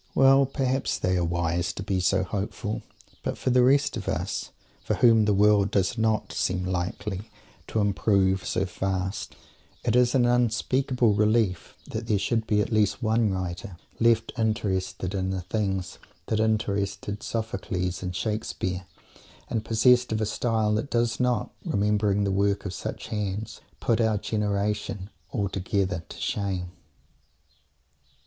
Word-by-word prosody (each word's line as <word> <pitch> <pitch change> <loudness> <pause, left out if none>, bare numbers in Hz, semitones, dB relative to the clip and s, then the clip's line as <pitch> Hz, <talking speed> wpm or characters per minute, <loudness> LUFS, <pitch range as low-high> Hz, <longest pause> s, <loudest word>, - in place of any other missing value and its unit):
Well, 135 0 +6
perhaps 135 -1 0
they 95 0 0
are 90 - +1
wise 85 +1 0
to 100 - -6
be 95 -1 0
so 95 +1 +2
hopeful. 105 +3 -3 0.4
But - - -3
for 130 - 0
the 125 0 +5
rest 140 +4 +4
of 105 -5 -5
us, - - -2 0.3
for - - 0
whom 115 -3 +5
the 105 - +3
world 105 0 +4
does 95 0 +1
not 110 -2 0
seem 90 0 0
likely 95 +3 -3 0.4
to 110 - -1
"improve" 100 -2 +2
so 95 - 0
fast, 95 0 -3 0.5
it 115 - +1
is 125 +1 +4
an 125 -2 +4
unspeakable 125 0 +2
relief 105 -3 +1
that 115 +1 -5
there 105 - +2
should 110 +3 0
be 105 -1 +3
at 105 - -2
least 110 +2 +2
one 110 0 +2
writer 95 +1 -4 0.2
left 115 -1 +3
interested 95 -4 -1
in 95 -1 -1
the 95 -1 -2
things 95 -1 -2 0.3
that 110 - 0
interested 100 -2 -1
Sophocles 95 -5 -3
and 90 -1 -4
Shakespeare, 95 -3 -3 0.6
and 110 -2 -1
possessed 125 +2 +4
of 110 - 0
a 110 - +1
style 110 -1 0
that 110 +6 -1
does 120 0 +1
not, 125 -1 +1
remembering 105 0 +1
the 100 - 0
work 100 +1 +1
of 95 - -3
such - - -6
hands, 105 +1 -3 0.2
put 115 -1 +1
our 110 -2 +2
generation 105 -1 -2 0.2
altogether 95 -4 -1
to - - -9
shame. 95 -3 -2
105 Hz, 150 wpm, -26 LUFS, 95-115 Hz, 0.6 s, Well